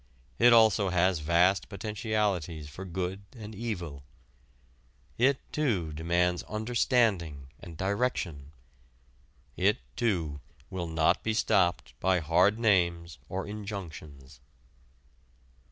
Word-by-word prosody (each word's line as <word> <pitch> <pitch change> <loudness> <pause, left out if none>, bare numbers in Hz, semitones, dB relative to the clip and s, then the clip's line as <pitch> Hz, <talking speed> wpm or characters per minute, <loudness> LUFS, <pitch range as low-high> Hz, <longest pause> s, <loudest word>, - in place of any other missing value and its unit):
It 120 +1 +7
also 110 -4 +5
has 90 -1 +2
vast 85 +5 +2
potentialities 100 -7 -2
for 90 +6 -9
good 95 +2 -4 0.2
and 110 -1 -8
evil. 90 -10 -5 1.2
It, 135 +3 +4 0.2
too, 100 - 0
demands 85 +3 +1
understanding 105 - 0
and 85 -2 -10
direction. 95 - -2 1.0
It, - - +2 0.2
too, 85 - -1 0.3
will 90 -2 -3
not 80 +2 +2
be 110 0 -1
stopped 90 - +1
by 95 0 +2
hard 90 +6 +3
names 85 -7 +1
or 95 +1 -3
injunctions. 80 - -8
90 Hz, 100 wpm, -29 LUFS, 80-105 Hz, 1.2 s, It